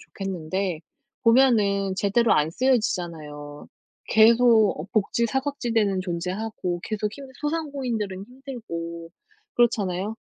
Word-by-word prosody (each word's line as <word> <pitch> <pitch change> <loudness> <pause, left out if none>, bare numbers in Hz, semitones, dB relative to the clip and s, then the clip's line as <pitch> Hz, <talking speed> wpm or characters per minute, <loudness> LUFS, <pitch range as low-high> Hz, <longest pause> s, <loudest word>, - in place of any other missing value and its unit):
좋겠는데 185 -2 -4 0.4
보면은 215 -6 +4
제대로 210 +4 +2
안 150 +1 +2
쓰여지잖아요. 165 - -2 0.4
계속 225 -4 +5
어 165 - -6
복지 225 +2 +1
사각지대는 230 -7 0
존재하고 180 +1 -3
계속 210 -1 -2
힘 280 -1 -9
소상공인들은 260 - -3
힘들고 170 -11 -7 0.4
그렇잖아요. 210 -3 +1
210 Hz, 280 characters per minute, -25 LUFS, 180-240 Hz, 0.4 s, 계속